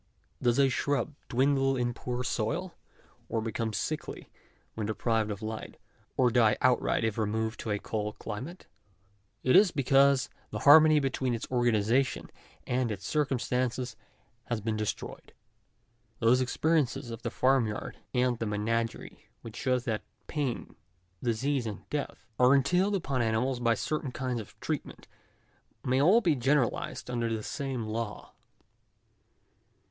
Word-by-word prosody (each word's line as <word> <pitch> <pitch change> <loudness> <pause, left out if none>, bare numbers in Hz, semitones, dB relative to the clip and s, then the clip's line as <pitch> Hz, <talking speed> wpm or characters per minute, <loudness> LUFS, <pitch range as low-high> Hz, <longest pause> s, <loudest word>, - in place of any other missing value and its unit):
Does 120 0 +2
a 140 -1 +5
shrub 140 +3 -1 0.2
dwindle 135 +1 +2
in 120 -1 0
poor 125 +1 -4
soil, 145 +10 -2 0.6
or 115 - 0
become 110 0 -2
sickly - - -4 0.4
when 110 -2 -3
de 110 - -2
prived 115 -2 0
of 105 +1 -5
light, 110 0 -6 0.4
or 125 -2 +4
die 110 -3 +4
outright 125 -2 +2
if 110 0 -1
removed 110 +1 -1
to - - -5
a 105 - +1
cold 105 0 -4
climate? 130 - -7 0.8
it 130 - +4
is 205 -2 +7
because 140 -1 +3 0.2
the - - -4
harmony 155 +1 +8
between 130 -3 -1
its 115 - -5
organization 120 +1 +1 0.3
and 125 -2 0
its 100 -2 -6
cir 150 -2 +1
cumstances 125 -2 -1 0.5
has 120 -2 -2
been 110 +1 -2
destroyed. 105 -1 -5 0.8
Those 120 +3 +4
experiences 130 -2 0
of 115 - -7
the - - -2
farm 130 -2 +2
yard 105 - -6
and 125 -2 +1
the 115 - -2
menagerie 115 +2 -2 0.2
which 115 -2 -9
show 130 -2 +1
that 120 -4 -2 0.2
pain, 140 -5 -3 0.5
disease, 125 +2 0
and 105 -2 -7
death, 150 -1 -4
are 125 +2 +6
entailed 180 +9 +2
upon 140 -9 -1
animals 120 +3 0
by 115 -1 +2
certain 150 -1 -2
kinds 125 -1 -2
of 105 - -15
treatment, - - -5 0.8
may 130 +1 +2
all 195 +10 +6
be 170 -7 +3
generalised 130 -1 0
under 120 -2 -1
the 110 -1 -2
same 135 -4 -3
law. 110 -1 -5
125 Hz, 145 wpm, -29 LUFS, 110-135 Hz, 0.8 s, harmony